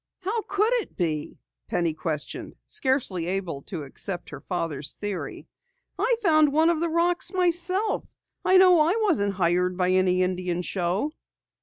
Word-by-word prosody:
"How 415 +5 -1
could 420 +4 +2
it - - -13
be?" 155 -4 -2 0.3
Penny 170 -2 0
questioned, 155 -1 -5
scarcely 260 - 0
able 180 -6 -3
to 165 -6 -5
accept 175 +6 -5
her - - -8
father's 150 -6 -3
theory. 205 -3 -5 0.5
"I 465 +5 +3
found 310 -5 +5
one 320 +3 +4
of 330 - -1
the 340 - +1
rocks 345 +2 +1
myself. 365 +3 +1 0.3
I 375 - +5
know 365 -2 +7
I 325 +6 +3
wasn't 205 - +1
hired 180 0 +1
by 180 -1 +2
any 185 0 +3
Indian 180 -1 -2
show!" 185 - -1
200 Hz, 150 wpm, -25 LUFS, -, 0.5 s, know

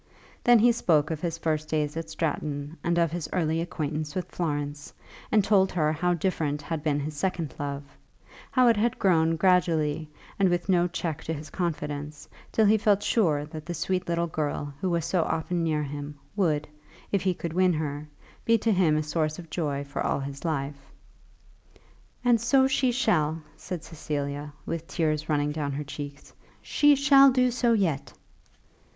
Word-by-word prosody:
Then 240 0 +7
he 235 +2 +5
spoke 160 -9 +2
of 155 -1 -3
his 165 -2 -2
first 155 -2 -1
days 150 -1 -1
at 165 -1 -4
Stratton 150 -2 -3
and 170 0 +1
of 170 -2 +2
his 170 -1 -4
early 165 -2 0
acquaintance 155 -1 -3
with 185 -1 -4
Florence, 145 -3 -3 0.4
and 215 -2 +4
told 195 -2 +3
her 155 -3 +1
how 175 +3 +1
different 155 -4 -1
had 160 0 -3
been 150 -2 0
his 150 +1 -4
second 170 -3 -2
love, 140 0 -3 0.7
how 255 -2 +4
it 230 -2 +5
had 230 +3 +1
grown 165 -5 +3
gradually 160 -4 +2 0.3
and 195 -2 +4
with 175 0 -1
no 180 -2 +3
check 165 -3 -4
to 160 - -2
his 150 +1 -9
confidence, 150 -4 -4 0.2
till 220 - +3
he 215 +1 +5
felt 205 -1 +3
sure 155 -10 +2
that 155 0 -9
the 175 - -3
sweet 185 +3 -1
girl 160 -4 -2
who 185 - 0
was 170 -2 0
so 180 - +1
often 165 +2 -1
near 155 -2 0
him 145 +1 -6 0.2
would, 155 -7 +1 0.4
if 200 - +1
he 185 -1 +1
could 170 -1 -5
win 185 0 +3
her, 150 -1 -3 0.4
be 230 0 +4
to 225 +1 +1
him 175 -6 +3
a 155 - 0
source 155 0 -1
of 165 -3 -11
joy 145 -4 -2
for 140 0 -5
all - - 0
his 140 0 -7
life. 140 -3 -3 1.3
"And 235 -2 +4
so 265 +3 +4
she 265 -1 +2
shall," 165 - +1
said 180 -4 -6
Cecilia, 145 -2 -4
with 165 0 -4
tears 155 -2 -1
running 145 -1 +1
down 145 -2 -3
her 145 +2 -3
cheeks; 145 0 -8 0.3
"she 290 0 +4
shall 275 0 +7
do 255 -1 +3
so 240 -1 +2
yet." 175 -10 0
160 Hz, 180 wpm, -27 LUFS, 150-185 Hz, 1.3 s, Then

